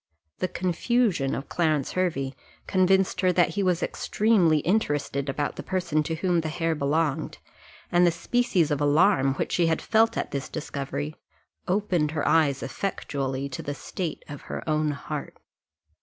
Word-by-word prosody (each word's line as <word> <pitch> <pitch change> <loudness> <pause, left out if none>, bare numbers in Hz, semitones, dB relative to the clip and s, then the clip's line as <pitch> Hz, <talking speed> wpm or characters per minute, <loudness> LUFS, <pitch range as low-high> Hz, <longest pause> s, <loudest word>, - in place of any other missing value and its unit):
The 185 - 0
confusion 185 - 0
of 135 - -5
Clarence 155 -5 0
Hervey 150 -8 -1 0.3
convinced 190 0 +2
her 185 -1 +4
that 175 0 +4
he 205 - -2
was 180 -2 +1
extremely 200 -8 +2
interested 145 -7 0
about 145 +2 -2
the - - -4
person 180 -5 0
to 160 +2 -2
whom 175 0 +1
the 160 - -3
hair 165 +1 0
belonged, 150 +1 -1 0.5
and 175 0 +4
the 175 - +6
species 175 -1 +1
of 145 0 0
alarm 145 -2 +3
which - - -2
she 170 -2 +2
had 160 -1 +1
felt 225 0 +2
at - - -2
this 140 -1 -4
discovery 135 - -4 0.5
opened 180 -5 +1
her 145 - 0
eyes 145 -4 +3
effectually 140 -8 -3
to 130 - -5
the 145 - -4
state 175 +1 -5
of 145 -2 -8
her - - -5
own 155 -1 +1
heart. 145 -1 -5
160 Hz, 160 wpm, -26 LUFS, 145-185 Hz, 0.5 s, the